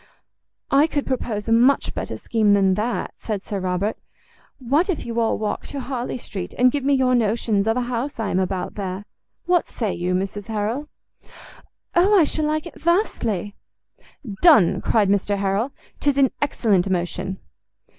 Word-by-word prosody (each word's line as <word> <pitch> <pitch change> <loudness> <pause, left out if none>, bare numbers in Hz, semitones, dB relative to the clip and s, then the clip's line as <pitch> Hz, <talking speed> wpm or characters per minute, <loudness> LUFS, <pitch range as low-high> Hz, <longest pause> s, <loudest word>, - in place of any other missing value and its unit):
"I 285 +3 +5
could 290 -3 -2
propose 230 -5 -3
a - - 0
much 245 +5 +3
better - - -4
scheme 215 -3 +2
than 195 -2 +4
that," 215 +5 -2
said 210 -3 -4
Sir 200 - -3
Robert; 185 +3 -1 0.6
"what 285 - +1
if 360 - -2
you 235 0 -2
all 225 -1 +1
walk 215 -1 -3
to 280 - -5
Harley 255 -1 -4
Street, 195 -6 -7
and 250 0 +5
give 285 0 -2
me 280 +1 +3
your 260 -1 +2
notions 220 -3 +1
of 225 +2 +2
a - - +1
house 245 +2 -3
I 220 -3 -1
am 185 - +1
about 190 0 -2
there? 195 0 -5 0.4
what 350 -1 +2
say 220 -5 -2
you, 180 +1 -1
Mrs 195 +2 -3
Harrel?" 225 +7 -2 1.0
"O, 380 +5 +4
I 350 - +6
shall 305 +1 -1
like 310 +1 -1
it 340 - -11
vastly." 235 - 0 0.9
"Done," 295 - +6
cried 215 -3 +2
Mr 200 +1 +1
Harrel; 200 +6 0 0.3
"'tis 285 -1 +1
an 270 -2 +4
excellent 205 -9 +1
motion." 185 +1 -2
225 Hz, 170 wpm, -22 LUFS, 200-275 Hz, 1.0 s, I